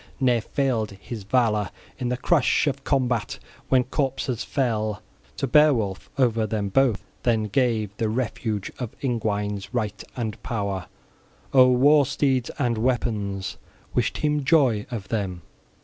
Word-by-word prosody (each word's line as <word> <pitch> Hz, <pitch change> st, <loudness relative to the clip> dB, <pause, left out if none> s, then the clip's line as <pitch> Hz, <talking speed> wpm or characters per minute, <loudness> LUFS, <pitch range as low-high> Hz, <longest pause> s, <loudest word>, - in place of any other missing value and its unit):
Ne'er 125 Hz, -4 st, +3 dB
failed 120 Hz, -4 st, 0 dB
his 110 Hz, +1 st, -7 dB
valor 105 Hz, -2 st, +1 dB, 0.3 s
in 125 Hz, -, -1 dB
the 125 Hz, -, -1 dB
crush 150 Hz, +2 st, +2 dB
of 140 Hz, -2 st, -2 dB
combat 125 Hz, -6 st, 0 dB, 0.3 s
when 130 Hz, -1 st, +4 dB
corpses 130 Hz, -2 st, -2 dB
fell. 110 Hz, -6 st, -1 dB, 0.4 s
To -, -, 0 dB
Beowulf 125 Hz, -9 st, +3 dB
over 115 Hz, -4 st, +2 dB
them 105 Hz, -1 st, -2 dB
both 125 Hz, -1 st, +2 dB, 0.2 s
then 115 Hz, -3 st, +2 dB
gave 110 Hz, -2 st, 0 dB
the 110 Hz, -, 0 dB
refuge 110 Hz, -3 st, -2 dB
of 125 Hz, -4 st, -5 dB
Ingwines 105 Hz, -5 st, -1 dB
right 105 Hz, -4 st, -2 dB
and 115 Hz, -4 st, -4 dB
power, 100 Hz, -5 st, -3 dB, 0.7 s
o'er 130 Hz, -2 st, +8 dB
war 145 Hz, +1 st, +5 dB
steeds 135 Hz, -3 st, +1 dB
and 120 Hz, -5 st, 0 dB
weapons: 110 Hz, -6 st, -1 dB, 0.4 s
wished -, -, 0 dB
him 150 Hz, -1 st, 0 dB
joy 130 Hz, -8 st, +3 dB
of 110 Hz, -5 st, -6 dB
them. 95 Hz, -6 st, -2 dB
120 Hz, 135 wpm, -24 LUFS, 105-130 Hz, 0.7 s, o'er